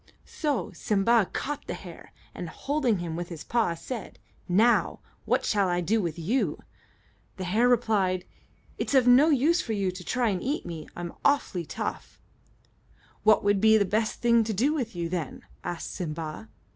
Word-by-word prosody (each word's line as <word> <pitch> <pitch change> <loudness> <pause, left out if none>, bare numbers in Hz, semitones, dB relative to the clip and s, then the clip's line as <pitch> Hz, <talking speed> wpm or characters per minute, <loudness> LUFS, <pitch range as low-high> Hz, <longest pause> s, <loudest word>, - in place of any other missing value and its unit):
So 295 -6 -2
Simba 210 0 +2
caught 290 +1 -4
the - - -3
hare, - - -11 0.2
and, - - -6
holding 275 -7 0
him 170 -2 -4
with 175 +1 -5
his 165 -3 -7
paw, 225 -8 0
said, 230 +6 -7 0.3
"Now, 220 +7 +3 0.3
what - - +1
shall 200 -2 +2
I 175 0 +1
do 215 +6 +1
with 170 -3 -3
you?" 205 +11 -1 0.7
The 190 - -4
hare 220 +7 +2
replied, 205 -7 +1 0.5
"It's - - -1
of 260 -2 +5
no 260 +6 +7
use 315 +5 +3
for 225 - -3
you 195 -3 0
to 180 0 -9
try 240 +1 0
to 180 - -5
eat 285 +4 -2
me; 165 -3 -7
I'm 175 -1 -6
awfully 280 - +1
tough." - - -5 1.0
"What 215 0 +4
would 205 -1 +2
be 220 0 +6
the 205 - +2
best 215 +3 -1
thing 235 -1 +4
to 220 - -2
do 260 +10 +2
with 245 - -3
you, 170 -1 -2
then?" 165 -5 -4 0.2
asked 175 -1 -5
Simba. 160 +3 -5
215 Hz, 175 wpm, -27 LUFS, 175-245 Hz, 1.0 s, no